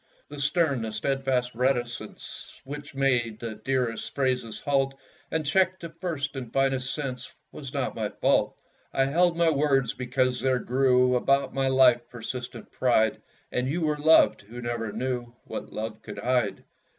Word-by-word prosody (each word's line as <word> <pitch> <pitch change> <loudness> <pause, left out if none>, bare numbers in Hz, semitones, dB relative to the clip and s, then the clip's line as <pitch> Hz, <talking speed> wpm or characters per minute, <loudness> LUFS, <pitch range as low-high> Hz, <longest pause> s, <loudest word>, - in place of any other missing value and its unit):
The 145 0 -8
stern, 145 -3 +2
the 110 -1 -3
steadfast 130 +2 0
reticence, 120 -3 -3
Which 145 +1 -8
made 120 -5 +1
the 115 -2 -4
dearest 120 +1 -2
phrases 125 -5 0
halt, 135 -1 +1 0.3
And 160 -1 -1
checked 185 +4 +2
a 170 - -5
first 160 -4 -4
and 125 -4 -6
finest 135 -1 +1
sense, 130 -4 -4 0.2
Was 135 -3 -8
not 135 -3 -2
my 110 -2 -2
fault. - - +1 0.3
I 135 - +2
held 170 +4 +2
my 170 -1 +4
words 140 -3 +2
because 125 0 0
there 130 0 +2
grew 125 0 +3
About 135 +3 +2
my 135 0 +1
life 125 -2 +4
persistent 120 0 -6
pride; 110 -3 +2 0.3
And 125 +1 0
you 170 +5 -1
were 155 -1 +1
loved, 160 +2 +5
who 110 +5 -10
never 120 -2 -3
knew 120 +1 -3
What - - -7
love 110 0 -5
could - - -9
hide! 120 -6 0
130 Hz, 160 wpm, -27 LUFS, 120-140 Hz, 0.3 s, loved